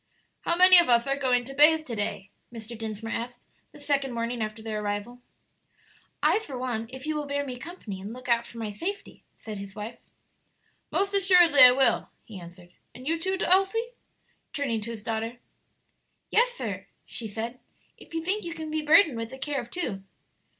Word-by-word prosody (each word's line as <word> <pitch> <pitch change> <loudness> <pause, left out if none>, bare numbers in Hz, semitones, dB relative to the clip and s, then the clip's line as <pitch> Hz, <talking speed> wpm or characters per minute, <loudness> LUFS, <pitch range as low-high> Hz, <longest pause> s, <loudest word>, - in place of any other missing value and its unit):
"How 340 - 0
many 365 0 +10
of 340 - +3
us 235 -1 +4
are 275 0 0
going 255 -3 +1
to 270 - -8
bathe 310 +2 +5
to 235 - -5
day?" 205 -2 -3 0.2
Mr. 230 0 -8
Dinsmore 225 0 -6
asked, 245 +2 -6 0.3
the - - -15
second 280 -3 -1
morning 235 0 -3
after 215 +1 -5
their 215 -1 -3
arrival. 205 +4 -4 1.0
"I - - +4
for 285 - -8
one, 240 -3 -3
if 260 +1 -8
you 310 0 -2
will 295 -1 -3
bear 285 0 -2
me 250 -2 -7
company 240 - -8
and 200 +3 -7
look 255 +2 -10
out 235 -1 +2
for 235 - -12
my 220 -2 -4
safety," 395 - -6
said 215 -2 -8
his 195 -1 -9
wife. 215 +3 -7 0.9
"Most 395 +1 0
assuredly 360 -6 +5
I 250 - +11
will," 265 +1 +2
he 210 -4 -10
answered. 175 +1 -13 0.2
"And 255 +2 -10
you 330 +1 0
too, 380 +3 -1
Elsie?" 390 +6 +2 0.6
turning 250 -7 -2
to 220 - -6
his 225 -3 -7
daughter. 225 +2 -3 0.9
"Yes, - - +4
sir," - - -6 0.2
she 230 - -4
said, 230 +4 -5 0.4
"if - - -13
you 325 - -2
think 400 +5 -1
you 335 -1 -6
can 315 -1 -6
be 310 0 -1
burdened 305 - +5
with 230 0 -4
the 265 - -9
care 280 0 -2
of 240 - -12
two." 230 - -4
250 Hz, 195 wpm, -27 LUFS, 225-320 Hz, 1.0 s, I